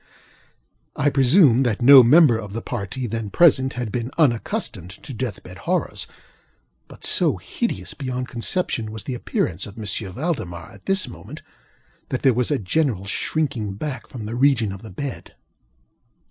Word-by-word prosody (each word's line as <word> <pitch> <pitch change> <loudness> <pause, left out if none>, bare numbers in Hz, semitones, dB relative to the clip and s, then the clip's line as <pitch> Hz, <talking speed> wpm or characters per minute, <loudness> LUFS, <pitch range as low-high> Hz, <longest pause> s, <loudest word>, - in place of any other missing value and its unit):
I 145 +1 +1
presume 135 - +5
that 120 -5 0
no 135 +2 +9
member 130 +1 +6
of 105 -2 -8
the 115 - -4
party 120 +2 -4
then 115 -2 -4
present 130 - +4
had 120 -3 -4
been 120 +1 -3
unaccustomed 120 - 0
to 135 +9 -10
death 120 -3 -5
bed - - -11
horrors; - - -1 0.8
but - - -7
so - - +3
hideous 95 -2 -4
beyond 130 -2 -4
conception 120 -2 -2
was 110 -1 -6
the 130 - -4
appearance 90 -6 -2
of 100 +2 -12
M. 110 - -6 0.3
Valdemar 110 - -4
at - - -17
this 195 -1 +2
moment, - - -11 0.7
that 130 - -3
there 135 -3 +5
was 125 +1 +1
a 145 - +1
general 110 - -1
shrinking 110 -3 -2
back 130 +1 -5
from 115 -5 -8
the 110 - -5
region 120 -4 +2
of 100 0 -8
the 110 - -10
bed. 135 +7 -7
120 Hz, 160 wpm, -22 LUFS, 110-140 Hz, 0.8 s, no